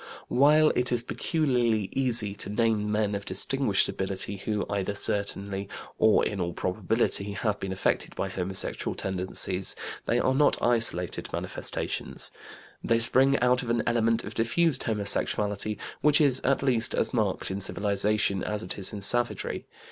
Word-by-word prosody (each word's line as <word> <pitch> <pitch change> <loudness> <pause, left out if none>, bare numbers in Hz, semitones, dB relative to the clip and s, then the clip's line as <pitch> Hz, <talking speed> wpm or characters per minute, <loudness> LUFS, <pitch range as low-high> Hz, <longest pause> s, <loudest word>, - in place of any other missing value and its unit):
While 150 +4 +4
it 125 0 +1
is 120 -1 0
peculiarly 120 - 0
easy 120 -6 +3
to 100 - -5
name 105 -1 0
men 105 -1 0
of 100 0 -4
distinguished 100 +3 +2
ability 95 +1 -3
who, 105 +1 -3
either 100 0 -3
certainly 100 -1 -2 0.3
or 110 -1 +4
in 100 -3 -3
all 85 -1 -3
probability, 100 +2 0
have 105 +1 -2
been 95 - -5
affected 95 - -2
by - - -2
homosexual 95 0 -3
tendencies, 95 0 -2 0.3
they 120 - +1
are 130 +2 +1
not 145 +2 +2
isolated 115 -8 0
manifestations. - - -1 0.5
They 115 - +2
spring 130 +4 +3
out 125 0 +3
of 120 - -7
an 115 -1 0
element 115 -1 +1
of - - -7
diffused 150 +8 +1
homosexuality 105 -1 0 0.2
which 150 0 +5
is 140 -4 +3
at 135 +1 0
least 120 -4 +4
as - - 0
marked - - -1
in 100 +1 -4
civilization 100 0 0
as 105 0 -3
it 90 +3 -4
is 95 - 0
in 100 -1 -5
savagery. 120 +3 0
105 Hz, 155 wpm, -27 LUFS, 100-120 Hz, 0.5 s, which